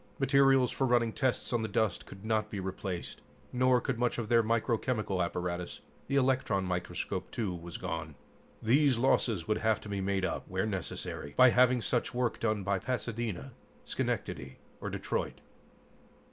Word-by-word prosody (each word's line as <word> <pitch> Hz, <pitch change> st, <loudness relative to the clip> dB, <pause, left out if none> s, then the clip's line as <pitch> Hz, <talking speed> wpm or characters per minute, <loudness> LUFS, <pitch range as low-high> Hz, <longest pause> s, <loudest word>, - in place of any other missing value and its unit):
Materials 135 Hz, -2 st, +4 dB
for 135 Hz, -, 0 dB
running 120 Hz, -2 st, +3 dB
tests 130 Hz, -2 st, 0 dB
on 120 Hz, -, +2 dB
the 110 Hz, -, -1 dB
dust 110 Hz, -5 st, 0 dB
could 95 Hz, +2 st, -11 dB
not 110 Hz, -1 st, +1 dB
be 105 Hz, -, -4 dB
replaced, 95 Hz, -1 st, -5 dB, 0.3 s
nor 125 Hz, 0 st, +4 dB
could 125 Hz, -1 st, -2 dB
much 120 Hz, -1 st, +1 dB
of 115 Hz, -3 st, -3 dB
their 115 Hz, -1 st, +6 dB
microchemical 115 Hz, -3 st, 0 dB
apparatus. 90 Hz, 0 st, -3 dB, 0.3 s
The 140 Hz, -, -1 dB
electron 130 Hz, -8 st, +2 dB
microscope, 90 Hz, -1 st, -3 dB
too, 105 Hz, -6 st, -2 dB
was 85 Hz, 0 st, -7 dB
gone. 80 Hz, -4 st, -4 dB, 0.5 s
These 135 Hz, +3 st, +4 dB
losses 115 Hz, -7 st, +2 dB
would 110 Hz, -, +1 dB
have 110 Hz, -1 st, +2 dB
to 105 Hz, -, -9 dB
be 100 Hz, -1 st, -2 dB
made 95 Hz, 0 st, 0 dB
up, 90 Hz, -, -3 dB
where 95 Hz, +2 st, -1 dB
necessary, 90 Hz, -7 st, -4 dB
by 130 Hz, -1 st, +8 dB
having 125 Hz, -1 st, +4 dB
such 120 Hz, -1 st, 0 dB
work 125 Hz, -2 st, 0 dB
done 110 Hz, -3 st, 0 dB
by 100 Hz, 0 st, +1 dB
Pasadena, 120 Hz, -1 st, -3 dB, 0.3 s
Schenectady 65 Hz, 0 st, -3 dB, 0.2 s
or -, -, -4 dB
Detroit. -, -, -3 dB
110 Hz, 160 wpm, -31 LUFS, 95-125 Hz, 0.5 s, by